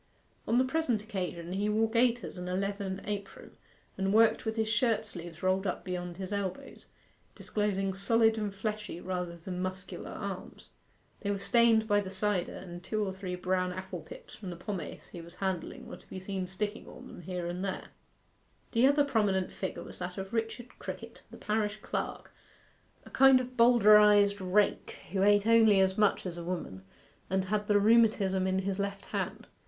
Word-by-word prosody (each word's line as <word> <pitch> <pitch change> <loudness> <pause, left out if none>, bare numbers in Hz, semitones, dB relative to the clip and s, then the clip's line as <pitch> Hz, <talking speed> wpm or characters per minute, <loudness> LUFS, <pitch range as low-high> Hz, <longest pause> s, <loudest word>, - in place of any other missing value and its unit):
On 230 - +3
the 255 - +4
present 260 -6 0
occasion 180 -5 -4
he 205 +2 0
wore 220 +1 +2
gaiters 235 -3 +1
and 180 0 -5
a 180 - -1
leathern 195 0 -2
apron, 200 -1 -6 0.4
and 195 0 +1
worked 225 +2 +4
with 220 0 -1
his 220 -1 0
shirt 225 -1 +1
sleeves 175 -5 -9
rolled 190 +1 +1
up 180 - -3
beyond 180 -1 -5
his 190 +1 -5
elbows, 195 -2 -5 0.5
disclosing 195 -2 -1
solid 225 +3 +3
and 210 -2 -2
fleshy 210 -2 -4
rather 180 -2 -4
than 180 +2 -6
muscular 185 0 -5
arms. - - -7 0.5
They 200 - -3
were 200 - 0
stained 225 +1 +3
by 205 -1 +4
the 190 - -6
cider, 195 -1 -1
and 175 -1 -9
two 215 -1 -1
or 190 - -3
three 190 -1 -5
brown 185 0 0
apple 185 +1 -6
pips - - -12
from 195 -4 -8
the 175 - -5
pomace 180 +1 -6
he 170 - -8
was 170 +1 -13
handling 190 -2 -3
were - - -8
to - - -22
be 190 - -6
seen 190 -1 -4
sticking 205 +3 -4
on - - -11
them - - -10
here 180 0 -4
and 175 +2 -3
there. 190 -2 -4 0.8
The 235 +3 +5
other 285 +1 +4
prominent 205 -8 +1
figure 190 - -5
was - - -9
that 180 +1 -5
of 195 +2 -6
Richard 230 +2 -4
Crickett, - - -8
the - - -11
parish 210 0 -1
clerk, - - -4 0.7
a - - -13
kind 270 -1 +7
of 255 0 -6
Bowdlerized 210 -4 +6
rake, 195 +3 +1
who 190 0 0
ate 205 +1 +5
only 225 -3 +6
as 190 0 +3
much 210 -2 +2
as 175 -1 -5
a - - -6
woman, 170 - -4 0.5
and 190 +1 +1
had 210 +2 -1
the 205 -1 +4
rheumatism 205 -4 +4
in 190 0 +1
his 195 0 -2
left 200 0 -3
hand. - - -4
200 Hz, 185 wpm, -30 LUFS, 185-220 Hz, 0.8 s, kind